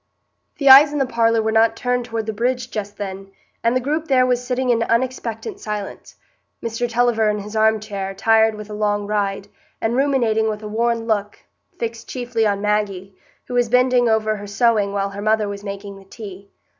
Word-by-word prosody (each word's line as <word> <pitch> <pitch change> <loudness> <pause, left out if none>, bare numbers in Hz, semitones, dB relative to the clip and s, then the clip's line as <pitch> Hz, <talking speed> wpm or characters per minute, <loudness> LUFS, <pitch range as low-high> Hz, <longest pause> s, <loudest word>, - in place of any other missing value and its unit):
The 280 - -1
eyes 275 +2 +9
in 295 - -3
the 270 - +2
parlour 230 -2 +2
were 220 - 0
not 225 0 +3
turned 250 0 -1
toward 225 -2 -4
the 220 - -3
bridge 245 +3 -1
just 205 -1 -5
then, 195 -1 -6 0.3
and 230 +2 +2
the - - +3
group 305 +5 -2
there 260 -3 +4
was 250 -1 0
sitting 250 0 0
in 230 -1 +1
unexpectant 245 - -2
silence,—Mr 225 - -6
Tulliver 230 -2 +2
in 210 - 0
his 210 +1 -8
arm 220 0 +3
chair, 200 -2 -5
tired 220 +2 +3
with 210 -1 -8
a - - -5
long 205 -1 -1
ride, 200 -1 -2 0.3
and 225 +2 -1
ruminating 240 -5 +2
with 215 0 -5
a - - -5
worn 230 +1 0
look, 210 -2 -1 0.4
fixed 230 0 -5
chiefly 240 -3 -1
on 200 -1 -1
Maggie, 200 -2 -1 0.3
who - - -8
was 245 -2 +2
bending 250 0 +3
over 215 -1 +1
her 205 0 -8
sewing 205 -1 +2
while 200 0 -2
her 200 +1 -7
mother 215 0 +1
was 200 0 -6
making 200 0 -7
the 195 - -17
tea. 200 -1 -10
220 Hz, 195 wpm, -20 LUFS, 205-245 Hz, 0.4 s, eyes